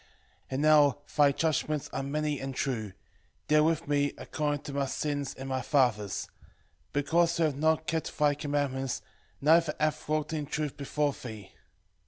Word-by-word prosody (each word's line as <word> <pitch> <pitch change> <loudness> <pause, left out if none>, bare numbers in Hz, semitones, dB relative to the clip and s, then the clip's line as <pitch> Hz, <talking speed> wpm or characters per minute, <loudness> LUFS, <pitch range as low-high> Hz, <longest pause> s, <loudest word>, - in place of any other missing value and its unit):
3:5 - - -29 0.4
And 130 +1 -2
now 150 -3 +6 0.2
thy 145 -2 +6
judgments 155 0 0
are - - -1
many 150 +1 -1
and 135 0 -5
true: 110 -8 -2 0.5
deal 150 0 +5
with 165 0 +1
me 145 -1 +1
according 145 -2 -2
to 140 - -7
my 140 -1 0
sins 145 0 -2
and 135 - -7
my 130 -1 -1
fathers': 120 -9 +1 0.6
because 165 +4 +2
we 165 - +3
have 150 -3 0
not 160 +2 +2
kept 160 0 -2
thy 150 -1 +4
commandments, 140 -3 -2 0.4
neither 160 +1 +4
have 155 0 -1
walked 155 0 0
in 150 -2 -2
truth 150 -1 -2
before 145 0 -1
thee. 110 -7 -9
145 Hz, 165 wpm, -29 LUFS, 135-155 Hz, 0.6 s, now